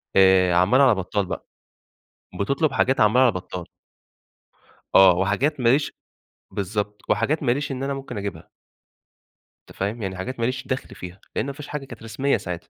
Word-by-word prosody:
آآ، 95 -2 +5
عمّال 95 +10 +4
على 125 -6 +6
بطّال 95 +2 -2
بقى. - - -6 1.0
بتطلب 140 +8 +1
حاجات 135 +1 +2
عمّال 110 +5 +5
على 125 - +5
بطّال. 90 -1 -6 1.3
آه، 95 -2 +8
وحاجات 115 +11 0
ماليش 130 +5 +2 0.5
بالضبط، 105 +1 -3
وحاجات 145 +9 +1
ماليش 135 +2 0
إن 130 - -4
أنا 140 0 -1
ممكن 135 -5 -6
أجيبها. 100 -5 -6 1.2
أنت - - -15
فاهم؟ 105 +4 -3
يعني 95 -2 -4
حاجات 125 +6 -5
ماليش 125 +3 -2
دخْل 130 - -4
فيها، 90 +1 -10
لأن - - 0
ما 140 - -4
فيش 145 +1 -10
حاجة 145 -2 -5
كانت 120 -4 -11
رسمية 120 +5 0
ساعتها. 90 -4 -7
110 Hz, 160 wpm, -23 LUFS, 95-135 Hz, 1.3 s, آه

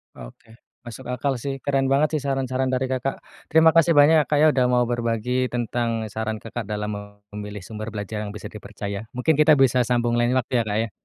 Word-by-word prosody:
Oke, - - -13 0.3
masuk 120 +2 -9
akal 125 +2 -1
sih, 135 +3 -3
keren 135 -1 +1
banget 150 +3 +2
sih - - -10
saran-saran 130 -1 -1
dari 130 0 -1
Kakak. 130 +1 -3 0.2
Terima 160 0 +5
kasih 165 0 +4
banyak 145 +2 +6
ya, 150 - +1
Kak, 150 - +1
ya, - - +7
udah 130 -3 +2
mau 125 0 +3
berbagi 120 +1 -1
tentang 120 -1 -2
saran 110 0 -3
Kakak 115 0 -7
dalam 105 0 -3 0.4
memilih 105 -1 -7
sumber 110 +2 -7
belajar 105 +1 -5
yang 100 - -8
bisa - - -8
dipercaya. 100 0 -7
Mungkin 150 +4 +1
kita 150 0 +6
bisa 130 -2 +3
sambung 120 -1 +1
lain 120 +2 +2
waktu 130 0 -1
ya, - - +1
Kak, 105 0 -1
ya. 115 - -6
125 Hz, 205 wpm, -23 LUFS, 110-135 Hz, 0.4 s, ya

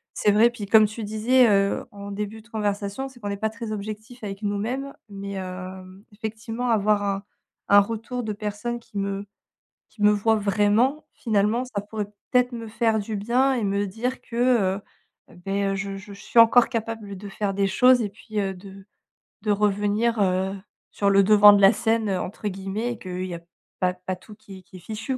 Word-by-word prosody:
c'est 210 - +3
vrai. 225 +3 +6
Puis, 230 -4 -7
comme 215 +2 +6
tu 215 +2 -5
disais, 230 +4 +3
heu, 200 -1 +2
en 200 0 -8
début 210 +2 -5
de 220 - -22
conversation, 205 +3 -2
c'est 260 -2 -17
qu'on 205 - -4
est 200 - -3
pas 220 +2 -1
très 225 0 -6
objectif 215 +3 -7
avec 195 -1 -6
nous 205 0 -1
mêmes 260 +7 -3 0.2
mais 200 -1 -6
heu, 185 +1 -8
effectivement, 225 +3 -4
avoir 210 -2 +2
un 200 -1 -2 0.5
un 205 - +8
retour 230 +4 -4
de 215 -1 -3
personne 210 +3 -4
qui 220 -3 -11
me 200 0 -2 0.6
qui 210 - -14
me 210 - +7
voit 220 +2 +2
vraiment 210 +7 +2
finalement, 220 +1 +1
ça 215 -5 -4
pourrait, 210 +1 -4 0.3
peut 250 - +6
être, 250 0 0
me 230 -1 -6
faire 225 0 +1
du 210 +1 -4
bien 245 +6 +2
et 235 - -1
me 200 0 0
dire 240 +6 -3
que, 230 - -10
heu, 220 -6 +2 0.5
beh, 195 +3 -3
heu, - - -1
je 195 0 -4
je 200 +1 -11
suis 205 +4 +1
encore 230 +1 +7
capable 225 -4 -4
de 200 +2 -8
faire 200 0 -2
des 195 0 +1
choses 250 +5 +5
et 205 - -2
puis, 215 +1 -6
heu, 195 -1 -1
de 195 +1 -12 0.6
de 215 - +1
revenir, 210 +3 +1
heu, 190 0 +1 0.4
sur 200 - +1
«le 195 0 +5
devant 210 +1 +8
de 205 - +4
la 195 +3 +7
scène», 225 +1 0
heu, 190 -2 0
entre 210 +3 -5
guillemets 195 +5 -3
et 225 - -12
qu'il 185 0 -5
y 175 - -5
a 170 - -9 0.4
pas 180 -1 +2
pas 185 +1 -5
tout 210 +4 -15
qui 200 -3 -13
est - - -16
qui 185 0 -14
est - - -11
fichu, 220 +8 -4
210 Hz, 210 wpm, -24 LUFS, 200-225 Hz, 0.6 s, un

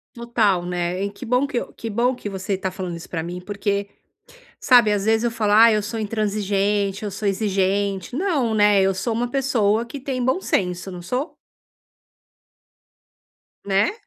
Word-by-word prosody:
Total 225 -6 +1
né, 180 +2 -2
e - - -2
que 200 - -10
bom 250 +4 +2
que 255 -4 -1 0.2
que 225 - -6
bom 240 +4 +1
que 210 -4 -6
você 190 0 -3
tá 190 0 -3
falando 180 -2 -5
isso 170 - -10
pra 165 -2 -3
mim 175 +1 -6
porque, 200 0 -2 0.7
sabe, 245 -5 +5
às 205 -1 0
vezes 220 +1 +2
eu 240 - +1
falo, 215 -2 0
ah, 225 +2 +8
eu 215 -1 +2
sou 220 +2 -4
intransigente 205 -1 -1
eu 205 - -4
sou 205 0 -2
exigente. 195 +1 0
Não, 295 - 0
né, 205 -2 +4
eu 195 0 +3
sou 195 +5 -2
uma 240 +2 -1
pessoa 235 -5 +1
que 275 +3 -8
tem 255 -2 -3
bom 260 +9 +1
senso, 180 - -1
não 180 -1 -8
sou? 250 - -3 2.3
Né? 195 +1 +2
205 Hz, 175 wpm, -22 LUFS, 195-235 Hz, 2.3 s, ah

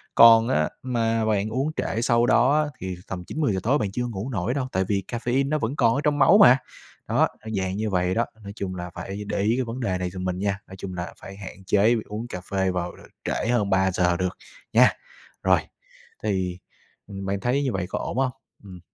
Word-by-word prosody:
Còn 115 0 +8
á, 75 +1 +2
mà 115 -3 0
bạn 105 -1 +1
uống 135 +7 -1
trễ 115 - -1
sau 120 0 +3
đó 140 +6 +4
á, 150 - -4
thì 95 -1 -4
tầm 90 -1 -5
9-10:00 135 - -1
tối 130 +6 +3
bạn 105 -8 -2
chưa 125 +4 -2
ngủ 110 +1 -5
nổi 110 -1 -1
đâu, 135 -2 -2
tại 95 - +1
vì 100 -1 0
caffeine 125 +3 0
nó 155 - +1
vẫn 120 +3 -2
còn 115 -5 +3
ở 140 - 0
trong 145 0 +1
máu 200 - +7
mà. 165 -11 +8 0.5
Đó, - - +3 0.2
ơ, 110 - -9
dạng 95 0 -2
như 110 0 -1
vậy 90 -1 +1
đó, 115 +4 +1 0.2
nói 100 - -7
chung 95 -3 -4
là 90 0 -5
phải 100 +3 -6
để - - -2
ý 110 +3 +2
cái 130 - +1
vấn 115 +2 -5
đề 95 -7 -1
này 90 0 -2
giùm 90 0 -6
mình 90 0 -2
nha, 100 0 -1
nói 95 - -10
chung 95 -1 -6
là 90 0 -5
phải 95 - -10
hạn 95 -1 -10
chế 105 +5 +4
uống 110 +3 -5
cà 90 -6 -6
phê 95 -1 +1
vào, 90 -1 -2
ờ, - - -16 0.2
trễ - - -1
hơn 115 -4 +1
3:00 95 -2 +2
được 90 0 -2 0.4
nha! - - +7 0.5
Rồi, - - +5 0.6
thì, 95 -4 -1 0.5
ừm, 100 -1 -7
bạn 100 0 -1
thấy 125 +7 +1
như 135 - 0
vậy 95 -2 -1
có - - -2
ổn - - -4
hông? 130 -1 +2 0.3
Ừm. 95 -3 -11
105 Hz, 235 wpm, -25 LUFS, 95-120 Hz, 0.6 s, Còn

